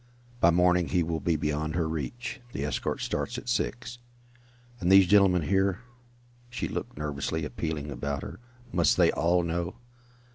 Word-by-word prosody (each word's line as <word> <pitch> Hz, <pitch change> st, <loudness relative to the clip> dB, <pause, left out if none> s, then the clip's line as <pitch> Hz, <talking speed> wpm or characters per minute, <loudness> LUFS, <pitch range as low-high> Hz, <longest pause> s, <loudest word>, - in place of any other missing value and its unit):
"By 85 Hz, -, +5 dB
morning 90 Hz, 0 st, +3 dB
he 90 Hz, -2 st, +1 dB
will 80 Hz, 0 st, -2 dB
be 80 Hz, +3 st, 0 dB
beyond 75 Hz, +1 st, -2 dB
her 85 Hz, -2 st, 0 dB
reach. 80 Hz, -, -5 dB
The -, -, -2 dB
escort -, -, -2 dB
starts 120 Hz, +3 st, -2 dB
at 125 Hz, -, -8 dB
six." 120 Hz, 0 st, -2 dB, 0.8 s
"And 90 Hz, 0 st, +1 dB
these 95 Hz, 0 st, +8 dB
gentlemen 95 Hz, -3 st, +4 dB
here 95 Hz, +3 st, +1 dB, 0.3 s
" -, -, -32 dB, 0.3 s
She 120 Hz, -1 st, -3 dB
looked -, -, -5 dB
nervously, 75 Hz, +1 st, -3 dB
appealingly 75 Hz, +2 st, -4 dB
about 70 Hz, +2 st, -3 dB
her. -, -, -8 dB, 0.3 s
"Must -, -, +3 dB
they -, -, +5 dB
all 85 Hz, +1 st, +2 dB
know?" 85 Hz, +3 st, -2 dB
85 Hz, 160 wpm, -28 LUFS, 75-95 Hz, 0.8 s, these